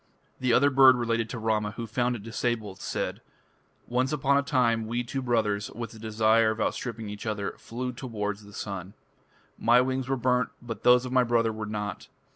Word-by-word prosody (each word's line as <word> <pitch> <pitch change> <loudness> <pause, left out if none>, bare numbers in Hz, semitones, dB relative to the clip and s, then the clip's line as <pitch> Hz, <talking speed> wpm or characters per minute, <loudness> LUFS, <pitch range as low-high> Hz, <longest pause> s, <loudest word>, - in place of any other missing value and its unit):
The 130 -1 +1
other 140 +4 +5
bird 130 -1 +7
related 115 -2 -1
to - - -5
Rama, 110 -1 0
who 115 +2 -5
found 120 +2 0
it 105 - -8
disabled: 115 -3 -3 1.0
"Once 125 +2 0
upon 140 -2 +2
a 140 - +4
time 115 -6 +1
we 120 +2 -1
two 135 +3 -4
(brothers), 110 -4 0
with 115 -1 -6
the 110 - -12
desire 110 0 +3
of 110 0 -3
outstripping 115 0 -2
each 105 +1 -7
other, 105 -2 -2
flew 125 +2 -4
towards 105 -5 -4
the 100 - -14
sun. 100 -1 -6 0.6
My 120 +2 +5
wings 130 0 -1
were 135 - +1
burnt, 125 -1 +1
but 115 -3 -7
those 125 +1 +5
of 125 - -5
my 130 -1 +4
brother 115 -2 +1
were 110 0 -5
not.... 105 -1 -4
115 Hz, 190 wpm, -27 LUFS, 110-125 Hz, 1.0 s, bird